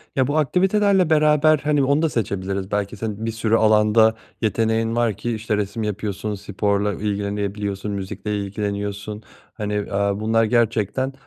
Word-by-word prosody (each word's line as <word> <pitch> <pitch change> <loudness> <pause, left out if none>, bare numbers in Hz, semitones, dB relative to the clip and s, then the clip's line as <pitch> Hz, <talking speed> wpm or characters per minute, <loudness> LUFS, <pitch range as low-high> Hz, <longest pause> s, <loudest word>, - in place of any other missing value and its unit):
Ya, 130 -2 +2
bu 145 +2 0
aktivitelerle 190 +3 +3
beraber, 155 0 +4
hani, 145 -1 +2
onu 140 +3 +2
da 165 - +2
seçebiliriz 100 -4 -3
belki 100 0 -2
senin 110 0 -4
bir 115 - -1
sürü 110 0 +1
alanda 110 0 +4 0.3
yeteneğin 115 +1 0
var 120 -2 +2
ki, 120 +1 -2
işte, 110 -1 -2
resim 105 +2 -3
yapıyorsun, 105 0 -3
sporla 100 +1 -1
ilgilenebiliyorsun, 100 0 -3
müzikle 105 +1 -4
ilgileniyorsun. 100 +1 -4 0.3
Hani, 105 -2 -3
aaa, 100 0 0
bunlar 110 +1 +2
gerçekten, 115 +2 +1
105 Hz, 145 wpm, -22 LUFS, 100-120 Hz, 0.3 s, beraber